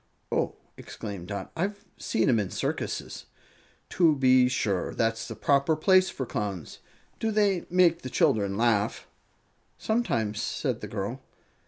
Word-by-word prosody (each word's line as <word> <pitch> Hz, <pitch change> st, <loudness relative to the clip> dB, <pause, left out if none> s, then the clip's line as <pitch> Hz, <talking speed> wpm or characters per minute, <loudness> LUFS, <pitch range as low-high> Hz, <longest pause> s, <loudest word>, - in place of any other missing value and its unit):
"Oh!" -, -, 0 dB, 0.2 s
exclaimed 100 Hz, -4 st, -7 dB
Dot. 100 Hz, 0 st, -5 dB
"I've 200 Hz, +4 st, -3 dB
seen 110 Hz, -, 0 dB
'em 120 Hz, -5 st, +4 dB
in 100 Hz, -3 st, -2 dB
circuses." -, -, -4 dB, 0.6 s
"To 165 Hz, -4 st, +4 dB
be 130 Hz, -2 st, +5 dB
sure; 100 Hz, -7 st, -1 dB
that's 115 Hz, 0 st, 0 dB
the -, -, -6 dB
proper 140 Hz, +3 st, +2 dB
place 185 Hz, +4 st, +4 dB
for 130 Hz, -, -4 dB
Clowns. 100 Hz, -6 st, -4 dB, 0.4 s
Do 225 Hz, -, 0 dB
they 205 Hz, -4 st, +1 dB
make 175 Hz, -1 st, +4 dB
the 130 Hz, -, -6 dB
children 100 Hz, -5 st, +1 dB
laugh?" 110 Hz, -3 st, +1 dB, 0.7 s
"Sometimes," 115 Hz, -, -1 dB
said -, -, -2 dB
the -, -, -5 dB
girl. -, -, -4 dB
130 Hz, 140 wpm, -27 LUFS, 105-180 Hz, 0.7 s, be